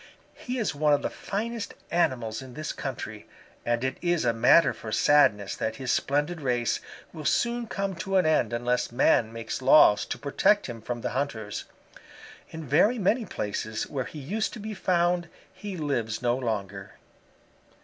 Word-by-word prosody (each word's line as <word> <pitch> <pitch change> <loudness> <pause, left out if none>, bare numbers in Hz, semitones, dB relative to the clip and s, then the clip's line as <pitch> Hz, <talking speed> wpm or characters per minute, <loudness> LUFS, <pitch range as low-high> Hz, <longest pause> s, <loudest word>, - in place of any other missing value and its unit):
He 250 +1 -5
is 225 -5 -1
one 150 0 +2
of 145 - +1
the - - -2
finest 225 +2 -4 0.2
animals 130 -10 0
in 130 -2 -11
this 155 0 -4
country, - - -6 0.4
and 120 +1 0
it 130 - -2
is 175 -5 +1
a 115 - +3
matter 125 +9 +5
for 110 - -8
sadness 105 -8 +3
that 110 0 -2
his 130 +1 -2
splendid 150 +4 0
race 120 -3 0 0.3
will 155 -2 -7
soon 235 - 0
come 195 -2 -2
to 190 +2 -3
an 185 - +3
end 155 -8 +2
unless 120 +1 -1
man 120 -2 +3
makes 115 +3 -5
laws 130 -5 +6
to - - -4
protect 200 +8 +2
him 115 -3 -7
from 120 +1 -4
the - - -3
hunters. 115 -6 -3 0.8
In 160 -1 -8
very 175 - +3
many 225 +3 +1
places 110 - -3
where 130 -3 -3
he - - -9
used 195 +11 -2
to 235 - -7
be 215 +1 -5
found 175 -2 +1 0.2
he 190 0 -7
lives 120 -8 -2
no 120 -1 +1
longer. 105 -6 -4
145 Hz, 170 wpm, -27 LUFS, 120-180 Hz, 0.8 s, laws